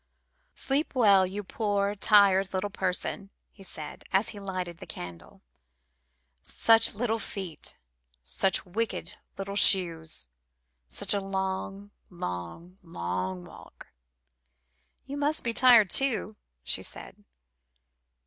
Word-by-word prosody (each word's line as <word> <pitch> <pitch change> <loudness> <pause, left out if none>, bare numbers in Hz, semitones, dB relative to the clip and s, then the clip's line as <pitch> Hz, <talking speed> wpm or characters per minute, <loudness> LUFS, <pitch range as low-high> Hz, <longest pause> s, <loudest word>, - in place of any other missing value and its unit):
"Sleep 275 +2 -1
well, 200 -6 +5
you 200 +3 -5
poor, 205 0 -1
tired 195 -2 +4
little 200 +2 -2
person," 190 +1 -2 0.2
he 200 - -18
said, 155 -5 -8
as 195 +3 +3
he 210 - -5
lighted 185 -3 -5
the - - -9
candle; 85 -1 -10 1.0
"such 225 - +4
little 225 +1 -1
feet, 190 -6 -5 0.5
such 180 - 0
wicked 220 +5 -3 0.2
little 200 0 -5
shoes, 170 -5 +4 0.6
such 65 - -1
a 200 - 0
long, 195 +1 -4 0.2
long, 165 - -7
long 90 - -4
walk." - - -14 1.2
"You 280 +1 -6
must 295 +2 0
be 235 - -1
tired, 235 -6 +6
too," 230 -6 0 0.3
she - - 0
said. - - -8
195 Hz, 110 wpm, -28 LUFS, 175-210 Hz, 1.2 s, tired